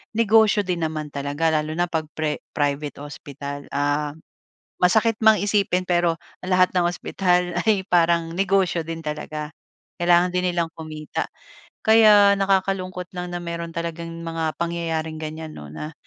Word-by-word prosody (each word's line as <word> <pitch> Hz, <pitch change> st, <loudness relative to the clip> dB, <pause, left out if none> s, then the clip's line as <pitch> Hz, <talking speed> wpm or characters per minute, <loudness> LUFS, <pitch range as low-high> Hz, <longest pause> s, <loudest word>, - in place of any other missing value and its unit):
negosyo 220 Hz, -2 st, +4 dB
din 180 Hz, -2 st, -2 dB
naman 155 Hz, -2 st, -3 dB
talaga 145 Hz, +3 st, 0 dB
lalo 155 Hz, +1 st, -4 dB
na 175 Hz, +1 st, 0 dB
'pag 160 Hz, -2 st, -1 dB
pre 155 Hz, -1 st, -1 dB, 0.2 s
private 145 Hz, 0 st, -2 dB
hospital. 145 Hz, -1 st, -8 dB
Ah, 145 Hz, +1 st, 0 dB, 0.6 s
masakit 215 Hz, +5 st, +3 dB
mang 220 Hz, 0 st, +7 dB
isipin, 200 Hz, -3 st, +1 dB
pero 175 Hz, -1 st, +2 dB, 0.3 s
ang 185 Hz, -, -5 dB
lahat 185 Hz, 0 st, +5 dB
ng 175 Hz, -1 st, +3 dB
ospital 180 Hz, 0 st, 0 dB, 0.2 s
ay 205 Hz, -3 st, +3 dB
parang 170 Hz, -1 st, +2 dB
negosyo 190 Hz, -2 st, +2 dB
din 165 Hz, 0 st, -6 dB
talaga. 150 Hz, 0 st, -5 dB, 0.5 s
Kailangan 175 Hz, +1 st, +4 dB
din 180 Hz, 0 st, +1 dB
nilang 170 Hz, -1 st, 0 dB
kumita. 155 Hz, -1 st, -5 dB, 0.6 s
Kaya 215 Hz, -2 st, +7 dB
nakakalungkot 190 Hz, -2 st, 0 dB
lang 180 Hz, 0 st, -5 dB
na 175 Hz, -, -2 dB
meron 170 Hz, 0 st, -4 dB
talagang 170 Hz, 0 st, -4 dB, 0.2 s
mga 165 Hz, -1 st, -2 dB
pangyayaring 165 Hz, -2 st, -2 dB
ganyan, 155 Hz, 0 st, -6 dB
'no 75 Hz, -, -9 dB
na 150 Hz, -, -7 dB
170 Hz, 145 wpm, -23 LUFS, 155-185 Hz, 0.6 s, mang